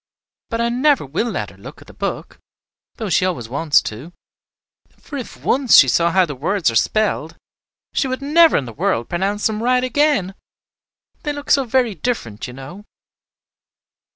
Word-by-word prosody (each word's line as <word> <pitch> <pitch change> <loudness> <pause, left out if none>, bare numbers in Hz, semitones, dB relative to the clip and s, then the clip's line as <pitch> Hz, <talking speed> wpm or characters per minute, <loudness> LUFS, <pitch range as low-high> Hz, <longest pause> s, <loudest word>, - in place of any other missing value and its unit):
But 230 0 -2
I 235 - +1
never 265 - +2
will 165 - -2
let - - -4
her - - -19
look - - -12
at - - -16
the - - -15
book, - - -5 0.6
though 220 - -5
she - - +3
always 170 -11 -2
wants 145 +5 +2
to; 130 +11 -8 0.8
for 290 - -10
if 255 - -8
once 260 -2 +2
she 135 - +8
saw 170 +7 +2
how 185 +2 +3
the 150 - -6
words 160 - 0
are - - -6
spelled, 195 - 0 0.6
she 275 - 0
would 260 0 -3
never 315 +4 +4
in 135 - -2
the 115 - -9
world 115 +2 -1
pronounce 195 +4 -1
them 215 0 0
right 250 +1 +2
again. 255 -7 +1 0.9
They 295 - -2
look 290 0 -6
so 275 -1 +4
very 245 -2 +1
different, 150 - -4
you 125 - -9
know." 135 +10 -10
205 Hz, 180 wpm, -19 LUFS, -, 0.9 s, she